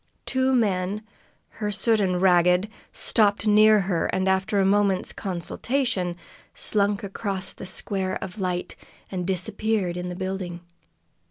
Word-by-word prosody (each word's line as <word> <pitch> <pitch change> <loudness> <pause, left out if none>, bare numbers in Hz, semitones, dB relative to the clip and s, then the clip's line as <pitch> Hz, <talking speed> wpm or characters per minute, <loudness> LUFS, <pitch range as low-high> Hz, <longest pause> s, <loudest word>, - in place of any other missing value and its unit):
Two 260 0 +1
men, 205 -4 0 0.6
hirsute 215 +1 +1
and 180 -2 +1
ragged, 180 +1 +4 0.2
stopped 210 -1 +2
near 215 0 +6
her 180 -3 0
and, 190 0 -1
after 190 +2 +1
a 195 - +3
moments 200 -1 +2
consultation, 190 +1 -2 0.4
slunk 205 0 +1
across 195 -1 -2
the 190 - -8
square 190 0 -3
of 190 +3 -6
light 180 -1 -2 0.4
and 180 -2 -3
disappeared 200 -1 -1
in 180 0 -4
the 180 - -5
building. 185 -2 -4
195 Hz, 125 wpm, -25 LUFS, 180-210 Hz, 0.6 s, near